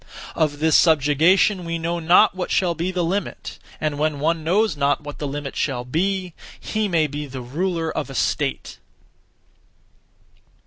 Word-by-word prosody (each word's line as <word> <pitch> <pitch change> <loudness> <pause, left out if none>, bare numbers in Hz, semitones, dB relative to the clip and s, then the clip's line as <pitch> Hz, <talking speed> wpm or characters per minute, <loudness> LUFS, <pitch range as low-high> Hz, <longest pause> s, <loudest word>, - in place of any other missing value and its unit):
Of 150 -2 0
this 160 +1 +2
subjugation 165 +5 +4
we 165 0 -3
know 170 +1 -2
not 175 +6 +5
what 185 -1 -4
shall 180 -3 +1
be 170 +2 -2
the 180 -1 -1
limit; 185 +2 -3 0.2
and 150 -2 -2
when 150 -1 0
one 160 +2 0
knows 190 +3 +2
not 145 0 +1
what 145 0 -8
the 145 - -3
limit 140 0 -5
shall 125 -4 -2
be, 185 +6 -1 0.3
he 215 -1 -2
may 165 -4 +2
be 150 0 -5
the 130 -1 -7
ruler 165 +5 -2
of - - -3
a 135 - -8
state. - - -2
160 Hz, 165 wpm, -22 LUFS, 145-180 Hz, 0.3 s, not